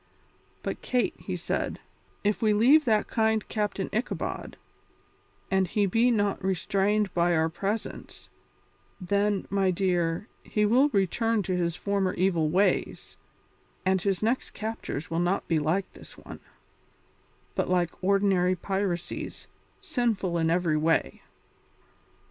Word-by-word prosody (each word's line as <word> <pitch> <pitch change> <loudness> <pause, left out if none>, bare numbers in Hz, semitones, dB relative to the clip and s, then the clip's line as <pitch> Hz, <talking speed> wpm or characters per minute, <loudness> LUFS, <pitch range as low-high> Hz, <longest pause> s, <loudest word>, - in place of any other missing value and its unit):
"But, - - -4
Kate," 250 -1 0
he - - -4
said, - - -2 0.5
"if 210 0 0
we 215 -2 +3
leave 270 +9 +5
that 215 -3 +2
kind 220 -1 +1
Captain 205 -3 -2
Ichabod, 225 +4 -3 0.9
and 190 -1 +2
he 205 +4 +1
be 225 +6 +3
not 205 -5 0
restrained 195 +2 +1
by 175 0 +2
our 160 0 +2
presence, 200 +6 -5 0.7
then, 200 +2 0
my 195 -1 +2
dear, 175 0 0
he 210 -1 0
will 255 +7 +4
return 215 - +1
to 185 0 -1
his 170 -2 0
former 200 -2 -1
evil 170 -4 +1
ways, 190 +5 0 0.7
and 190 0 +2
his 195 0 -1
next 235 +4 -1
captures 215 -9 -5
will 165 - 0
not 175 +3 0
be 165 -2 +2
like 170 +6 -1
this - - -13
one, - - -10 1.1
but - - -1
like 180 -1 0
ordinary 190 -2 +3
piracies, 190 -1 -3 0.4
sinful 225 - -1
in 160 0 +2
every 165 -2 +2
way." 155 - +1
195 Hz, 130 wpm, -27 LUFS, 175-210 Hz, 1.1 s, leave